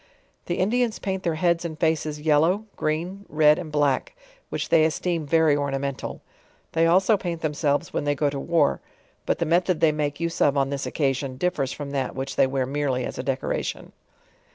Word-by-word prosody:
The 175 - -1
Indians 230 +5 +1
paint 190 -1 -3
their 170 -3 -1
heads 170 +1 +1
and 160 -3 -5
faces 155 -2 0
yellow, 160 +7 +3
green, 175 +6 -2
red 150 0 +4
and 165 -4 -7
black; 145 - +1 0.3
which - - -3
they 160 -1 +5
esioem 160 +1 0
very 160 -1 +4
ornamental. 140 -1 -3 0.5
They 165 0 +3
also 190 +5 +4
paint 175 -4 -4
themselves 145 -2 0
when - - -1
they 145 0 +1
go 145 0 +1
to 140 - -4
war; 160 - +1 0.5
but - - +1
the 170 - -1
method 175 +1 +2
they 160 - +4
make 150 -1 -2
use 170 0 -3
of 145 0 +4
on 135 0 +1
this 140 -1 -3
occasion 135 -2 -1
di 180 +6 +1
tiers 135 -8 -2
from 145 -1 -6
that 135 -2 -2
which 135 +1 -4
they - - +4
wear 130 -1 -1
merely 135 -2 -1
as - - -6
a - - -2
decoration. 135 -1 -3
155 Hz, 195 wpm, -24 LUFS, 140-170 Hz, 0.5 s, they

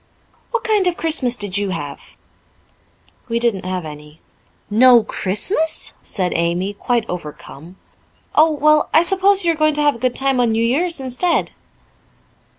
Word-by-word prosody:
"What 475 -2 -2
kind 420 -4 +2
of 355 - 0
a - - -27
Christmas 270 -7 +1
did 205 -1 -1
you 200 -1 -2
have?" 145 -6 -7 1.1
"We 230 - 0
didn't 230 -6 -1
have 185 -2 -3
any." 150 +1 -11 0.5
"No 240 +2 +6
Christmas!" 315 - -2
said 185 -3 -3
Amy, 175 +4 -1
quite 230 +2 -1
overcome. 165 0 -9 0.6
"Oh, 315 +2 +5
well, 305 0 +2
I 320 - +6
suppose 390 +1 +2
you 340 - +4
are - - -2
going 310 -1 +1
to 300 - 0
have 290 -1 +3
a 230 - -11
good 255 0 -1
time 270 -1 0
on 235 -2 +2
New 225 +1 +1
Year's 325 +7 0
instead." 265 +7 -1
245 Hz, 160 wpm, -19 LUFS, 190-315 Hz, 1.1 s, No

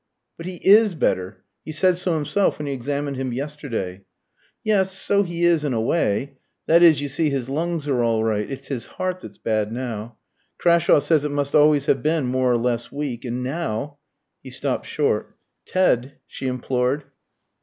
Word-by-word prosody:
"But 165 - -8
he 185 - -5
is 210 -1 +6
better. 95 -9 -1 0.2
He - - -7
said 180 +4 +3
so 180 -1 0
himself 160 +6 +1
when 150 - -5
he 140 - -2
examined 140 +2 -3
him 130 -1 -3
yesterday." 120 -9 -4 0.6
"Yes, 195 -3 +2
so 200 +1 +2
he 175 -3 -3
is, 170 -3 +3
in 145 -3 -1
a - - 0
way. 130 +1 0 0.3
That 165 +2 +5
is, 160 -5 +6
you 145 - -2
see, 150 +3 0
his 135 -3 -3
lungs 160 +1 -2
are 130 -4 +1
all 115 -2 +1
right. 105 -2 -1
It's 135 - -7
his 130 -5 -4
heart 185 0 -2
that's - - -11
bad 110 -1 -1
now. 115 -2 -5 0.4
Crashawe 170 -3 +4
says 155 -2 +2
it 150 - -1
must 145 -1 -2
always 150 -2 +5
have - - +2
been 155 -2 +1
more 130 0 +1
or 120 - +3
less 120 0 -2
weak. 140 -4 -4
And 125 +1 -3
now 145 -1 -3 0.2
" - - -55
He - - -9
stopped - - -3
short. - - -1 0.3
"Ted 140 -8 +1
" - - -52
she 135 - -6
implored. 125 +2 -1
140 Hz, 190 wpm, -22 LUFS, 125-165 Hz, 0.6 s, is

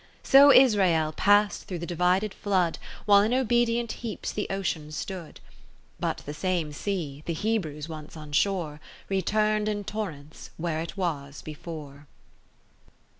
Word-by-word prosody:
So 280 +1 +8
Israel 190 - +5
past 205 +5 +3
through 180 - -4
the 170 - -5
divided 180 +4 +1
flood, 185 -5 0 0.3
While 200 -1 +7
in 220 +4 +1
obedient 240 -2 +1
heaps 230 -4 -5
the 210 - -3
Ocean 170 -6 -3
stood: 170 +2 -6 0.6
But - - -2
the 145 - -5
same 170 -2 -1
sea 150 -5 -4
(the 170 - 0
Hebrews 160 -7 -2
once 155 -1 -9
on 150 -1 -10
shore) 160 -2 0 0.3
Return'd 210 +2 +1
in 205 -1 -2
torrents 165 -9 -6
where 165 -1 -2
it 165 +4 -7
was 145 -6 -3
before. 150 -2 -9
180 Hz, 135 wpm, -27 LUFS, 155-210 Hz, 0.6 s, So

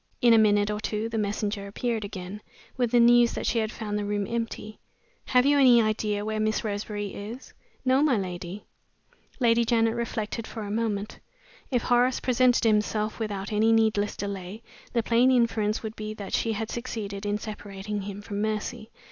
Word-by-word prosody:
In 240 -1 +6
a 225 - +7
minute 205 -1 +3
or 210 - -2
two 215 +1 -2
the 225 -1 -2
messenger 205 -1 -2
appeared 225 +2 -2
again, 200 0 -7 0.3
with 245 -2 +1
the 240 +1 +4
news 240 0 +6
that - - -4
she 235 - +1
had 220 0 -1
found 210 -3 -3
the - - -2
room 205 0 -1
empty. 230 -2 -4 0.5
"Have 250 0 +3
you 285 0 +4
any 250 -3 +7
idea 215 -2 0
where 215 0 -2
Miss 215 +1 0
Roseberry 205 -1 -4
is?" 225 +6 -8 0.3
"No, 260 +2 +4
my 290 -6 +3
lady." 185 0 -5 0.7
Lady 235 -2 +4
Janet 225 -1 +2
reflected 230 -1 -3
for 225 - -6
a 205 - -5
moment. 215 -2 -2 0.5
If 245 -4 0
Horace 245 +1 +3
presented 255 0 +3
himself 215 0 +1
without 205 -2 -3
any 220 +2 +3
needless 220 -2 +2
delay, 200 +2 -5 0.3
the 235 -2 +1
plain 235 +3 +4
inference 230 -4 +1
would 220 -1 -4
he 215 0 -5
that 200 -2 -7
she 225 - +1
had 220 +1 -4
succeeded 215 -5 -5
in 205 0 0
separating 210 -1 -6
him 200 +1 -7
from 205 -1 -4
Mercy. 215 +1 -3
215 Hz, 180 wpm, -27 LUFS, 205-235 Hz, 0.7 s, a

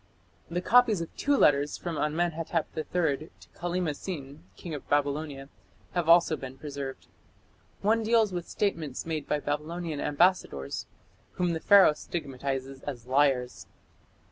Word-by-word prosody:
The 175 +1 -2
copies 230 -2 +5
of 165 - -6
two 285 0 +2
letters 145 - +3
from 170 -2 -4
Amenhotep 165 +1 -1
III 155 -2 -1
to - - -17
Kallima 175 -3 -2
Sin, 145 -3 -7
King 170 - -7
of 145 - -7
Babylonia, 145 -1 -1 0.4
had 175 -2 -1
also 170 -1 +6
been 135 -2 -8
preserved. 140 -2 -6 0.8
One 225 +3 +3
deals 220 -3 +3
with 175 -1 -4
statements 160 -10 -2
made 155 -3 -3
by 150 - 0
Babylonian 155 +2 -3
ambassadors, 145 - +1 0.5
whom 180 -2 0
the 160 - -2
Pharaoh 195 -3 +7
stigmatizes 135 -4 -4
as 125 -5 -6
liars. 130 -2 +1
155 Hz, 135 wpm, -28 LUFS, 140-175 Hz, 0.8 s, Pharaoh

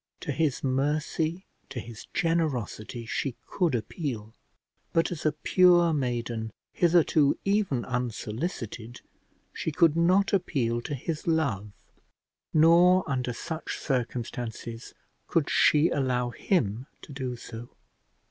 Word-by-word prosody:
To 150 - -3
his 145 -1 0
mercy, 150 +6 0 0.2
to 135 -3 -5
his 115 -1 -9
generosity, 130 -8 -1
she 125 +2 -2
could 175 -8 0
appeal; 115 - -4 0.6
but 165 +1 +2
as 160 -3 -2
a - - +3
pure 175 +2 +4
maiden, 120 -5 -2 0.2
hitherto 165 -4 +3
even 195 - +1
unsolicited, 120 - -4 0.5
she 160 - -3
could 160 +1 +4
not 185 +5 +3
appeal 125 -11 0
to 145 - -4
his 155 +5 -5
love, 130 - 0 0.8
nor 175 +4 +5
under 130 -3 -1
such 160 +7 -5
circumstances 120 -3 -4 0.3
could - - +1
she 150 +2 +5
allow 125 -3 0
him 125 - 0 0.2
to - - -11
do 130 -2 -3
so. 115 0 -9
140 Hz, 115 wpm, -27 LUFS, 120-165 Hz, 0.8 s, nor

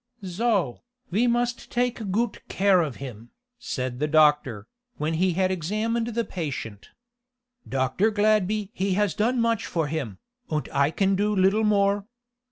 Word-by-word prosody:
"So, 190 - 0 0.3
ve 225 +7 +2
must 240 0 0
take 240 -4 -1
goot 230 +5 -1
care 190 -2 +4
of 145 -7 -3
him," 120 -4 -9 0.3
said 125 - -4
the 150 - +1
doctor, 150 -8 +3 0.3
when 155 +2 -1
he 180 +2 +2
had 185 +1 +1
examined 215 +7 -1
the 235 -1 0
patient. 135 - -5 0.8
"Dr. 135 +11 +1
Gladby 210 -1 +1
he 195 -3 0
has 205 -3 +1
done 240 +7 +1
much 230 -2 +1
for 165 -2 -1
him, 145 -10 -4 0.3
und 155 -1 -1
I 140 +1 +3
can 195 +4 +1
do 210 +2 +1
little 195 +3 +3
more. 200 -1 +2
190 Hz, 150 wpm, -25 LUFS, 150-215 Hz, 0.8 s, care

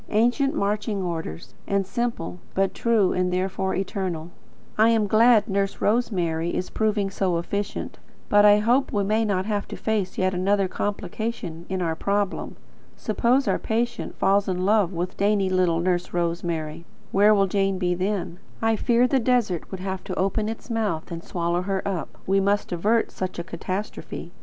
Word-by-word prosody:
Ancient 245 +7 +2
marching 205 0 -1
orders, 160 - -5
and 200 -1 +1
simple; 195 -4 -3 0.2
but 195 -1 +1
true, 220 -5 +2
and 180 0 0
therefore 190 +1 -1
eternal. 180 -4 -3 0.4
I 220 +1 +5
am 225 -2 +3
glad 220 +2 +5
Nurse 195 -1 -1
Rosemary 175 -7 0
is 185 - -3
proving 210 -3 0
so 185 -3 0
efficient, 200 +4 -4 0.3
but 205 0 +5
I 205 0 +7
hope 240 +6 +2
we 205 -1 +1
may 215 +3 +1
not 195 -3 0
have 205 -1 -2
to - - -7
face 210 -4 -1
yet 185 0 +1
another 195 +2 +2
complication 200 -3 -4
in 185 -1 -1
our 165 -1 -1
problem. 200 +3 -1 0.4
Suppose 240 +5 +1
our - - +1
patient 235 +1 -2
falls 195 +1 +3
in 185 -1 -1
love 205 -3 +3
with 180 +1 -4
dainty 200 -1 +2
little 180 -3 +2
Nurse 175 0 0
Rosemary, 170 -2 -2 0.3
where 210 +2 +5
will 195 -1 +4
Jane 195 0 0
be 180 -1 +1
then? 185 -1 -2 0.2
I 225 -1 +2
fear 235 +3 +3
the 265 +2 +2
desert 230 -8 +1
would 190 -2 -6
have 190 0 -4
to - - -4
open 205 +3 0
its 225 +2 -7
mouth 210 -9 -1
and 170 0 -5
swallow 170 0 -1
her 195 +1 -2
up. 185 -4 -4
We 195 +1 +3
must 200 +1 +1
avert 210 +7 +1
such 185 -1 -4
a 170 - -3
catastrophe. 185 +4 -5
195 Hz, 170 wpm, -24 LUFS, 180-215 Hz, 0.4 s, I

